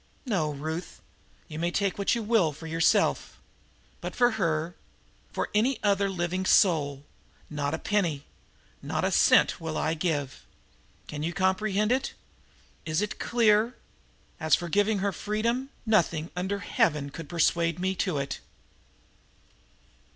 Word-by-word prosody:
No, 185 - 0
Ruth, 160 +4 -5 0.5
you 155 - -7
may 170 +1 +1
take 200 +2 -1
what 200 - +2
you 235 - -2
will 210 -7 +3
for 165 - -11
yourself, 165 0 +1 0.6
but - - -6
for 245 -1 +4
her, 165 -5 -1 0.6
for - - -3
any 235 +5 +2
other 200 -1 +2
living 180 0 -2
soul, 150 -8 +3 0.5
not 145 0 -1
a - - -4
penny, 170 -9 0 0.6
not - - -2
a - - +1
cent - - +4
will 160 -1 -3
I 155 - 0
give. 155 -5 -2 0.6
Can 150 - -6
you 165 +3 -2
comprehend 195 +3 +1
it? 265 +2 0 0.7
Is 155 +4 0
it 210 - -4
clear? 230 0 +3 0.6
As 155 0 +4
for 175 -1 -5
giving 205 +4 +2
her 200 - +1
freedom, 230 +7 -2 0.2
nothing 170 -7 +1
under 190 +3 -2
Heaven 150 -7 0
could 155 0 -8
persuade 170 0 +1
me 190 +1 0
to 180 -6 0
it!" 140 0 -3
180 Hz, 140 wpm, -27 LUFS, 160-210 Hz, 0.7 s, for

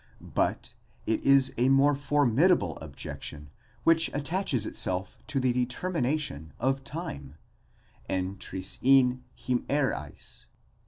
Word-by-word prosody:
But - - -1 0.3
it 110 - 0
is 135 -1 +5
a 125 +2 +4
more 135 +2 +5
formidable 140 - +2
objection 75 -1 -8 0.3
which 165 0 +4
attaches 145 - 0
itself 95 -1 -2
to 140 - 0
the 130 -1 +2
determination 125 - -2
of 135 +1 0
time, 135 - -7 0.7
ἐν 95 +1 -2
τρισὶν 125 +8 +2 0.2
ἡμέραις. 125 - -2
130 Hz, 100 wpm, -28 LUFS, 95-145 Hz, 0.7 s, is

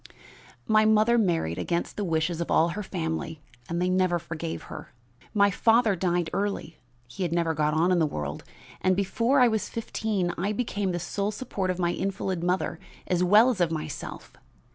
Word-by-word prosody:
"My 215 +5 +4
mother 220 +2 +4
married 165 - 0
against 170 0 -2
the 205 - -2
wishes 165 -1 0
of 170 - -3
all 165 +2 +4
her 205 +5 -4
family 160 -4 -4 0.3
and 170 - -1
they 180 - +1
never 185 -1 +2
forgave 165 0 -5
her. - - -10 0.4
My 200 -2 +4
father 225 +1 +3
died 175 -1 0
early 200 -5 -3 0.3
he 125 +11 -9
had 175 -3 0
never 170 -1 +1
got 150 0 0
on 170 +3 +3
in 180 - +3
the 160 - +3
world 75 - -5 0.4
and 185 0 +3
before 230 +7 +1
I 250 - +7
was 220 -2 -1
fifteen 215 -5 -2
I 200 +4 0
became 205 -4 -1
the 175 - -2
sole 200 +4 -2
support 210 -4 -3
of 185 - -1
my 175 -1 +1
invalid 190 -2 -2
mother 180 -1 -1 0.3
as 180 0 +1
well 215 +7 +6
as 205 -7 -3
of 170 - +3
myself. 155 -2 -6
180 Hz, 185 wpm, -27 LUFS, 170-205 Hz, 0.4 s, I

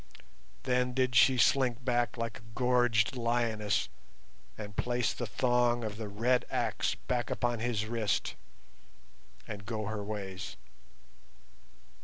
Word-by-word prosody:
Then 125 -1 +1
did 130 -1 +2
she 120 +4 +6
slink 125 +1 +3
back 120 -1 +1
like 115 -1 -3
a 110 0 -17
gorged 120 -2 +3
lioness 115 -4 0 0.7
and 105 -2 -7
place 120 -1 0
the 120 - -4
thong 120 +1 +2
of 105 -1 -4
the 110 -1 -4
red 120 +5 +2
axe - - 0
back 125 -1 -2
upon 120 -1 0
his 110 -2 -1
wrist 110 -2 -1 1.1
and 100 -2 -6
go 110 0 -3
her 105 0 -3
ways. 100 -3 -5
115 Hz, 125 wpm, -31 LUFS, 105-125 Hz, 1.1 s, she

